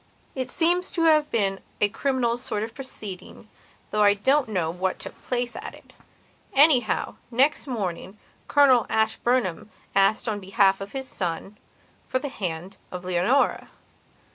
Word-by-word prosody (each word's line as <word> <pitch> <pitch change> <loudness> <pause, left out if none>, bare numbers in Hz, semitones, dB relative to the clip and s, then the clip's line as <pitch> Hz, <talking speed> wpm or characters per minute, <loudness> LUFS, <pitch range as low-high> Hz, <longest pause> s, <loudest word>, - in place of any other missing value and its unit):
It 260 -2 -3
seems 350 +5 +3
to 335 - 0
have 310 -2 +4
been 195 -4 0 0.2
a 205 - +4
criminal 240 +1 0
sort 225 -4 -3
of 225 +1 -6
proceeding, 220 -8 -8 0.4
though 210 - +1
I 205 -1 +6
don't 265 +5 +2
know 175 -6 -1
what 185 +2 -2
took - - -10
place 245 -1 -2
at - - -7
it. - - -19 0.6
Anyhow, 270 -5 +3
next 265 +5 +2
morning 195 -4 -4 0.3
Colonel 265 -5 +5
Ashburnham 220 -3 0 0.2
asked 195 +4 +3
on 210 -2 -1
behalf 195 0 +2
of 195 - -7
his 265 -1 -4
son 185 +1 -4 0.5
for 260 - 0
the 280 +2 -4
hand 180 -6 -5
of 180 0 -7
Leonora. 185 +10 +1
220 Hz, 145 wpm, -25 LUFS, 195-260 Hz, 0.6 s, I